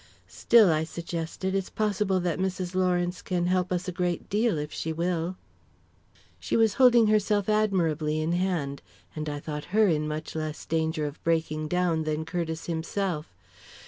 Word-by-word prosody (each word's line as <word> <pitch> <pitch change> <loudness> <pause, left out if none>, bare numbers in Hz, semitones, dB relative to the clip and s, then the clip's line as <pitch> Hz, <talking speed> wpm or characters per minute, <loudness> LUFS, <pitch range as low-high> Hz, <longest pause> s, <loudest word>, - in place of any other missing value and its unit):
"Still," 220 -7 +5
I 155 0 +1
suggested, 170 +3 -4
"it's 195 -1 -1
possible 205 -3 0
that 175 0 -1
Mrs. 185 -1 -2
Lawrence 180 -1 0
can 175 -2 -1
help 185 0 +1
us 180 0 -1
a - - -1
great 175 -1 -2
deal, 215 -2 +2
if 150 0 -4
she 160 - -3
will." 170 +2 -1 1.0
She - - -1
was 225 -3 +4
holding 240 -3 +7
herself 210 -1 +2
admirably 170 -8 +1
in 155 +2 0
hand, 175 -6 -1 0.3
and 155 -1 -3
I 145 0 -4
thought 150 0 -5
her 220 -1 +6
in 155 -2 +1
much 155 +1 -5
less 155 -1 -4
danger 160 -1 0
of 145 0 -7
breaking 160 -2 0
down 175 -1 +1
than 155 0 -2
Curtiss 165 -1 -3
himself. 165 - -3
175 Hz, 165 wpm, -27 LUFS, 160-190 Hz, 1.0 s, holding